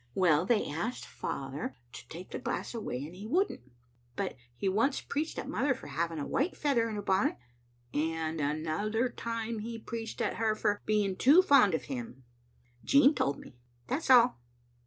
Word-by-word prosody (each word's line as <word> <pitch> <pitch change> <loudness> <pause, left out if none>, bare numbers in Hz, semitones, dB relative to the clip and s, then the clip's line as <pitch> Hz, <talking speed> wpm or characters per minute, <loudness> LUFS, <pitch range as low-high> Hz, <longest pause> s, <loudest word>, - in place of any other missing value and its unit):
Well, 175 -2 +3
they 225 -2 +2
asked 175 +12 -3
father 135 0 -5 0.2
to - - -10
take 175 +3 -9
the - - -4
glass - - -3
away, 145 - -4
and 160 - -10
he 205 +3 -8
wouldn't; 255 - 0 0.4
but - - -2 0.2
he 195 - -2
once 225 +9 +2
preached 305 +3 -3
at - - -4
mother 265 +3 +1
for - - -12
having 165 +3 -2
a 145 - -3
white 295 +7 -1
feather 245 -6 +1
in 215 - -4
her 205 - -4
bonnet, 190 0 +2 0.6
and 160 +1 -1
another 165 - 0
time 230 -1 -4
he 230 +2 -5
preached 225 0 -6
at - - -1
her 220 -1 +1
for 210 -1 0
being 205 -3 +1
too 310 +8 +7
fond 260 - +6
of - - -3
him. 240 - -6 0.6
Jean 280 +1 +6
told 140 - 0
me. 120 - -14 0.3
That's 295 - -2
all." 245 - +6
215 Hz, 180 wpm, -31 LUFS, 160-245 Hz, 0.6 s, too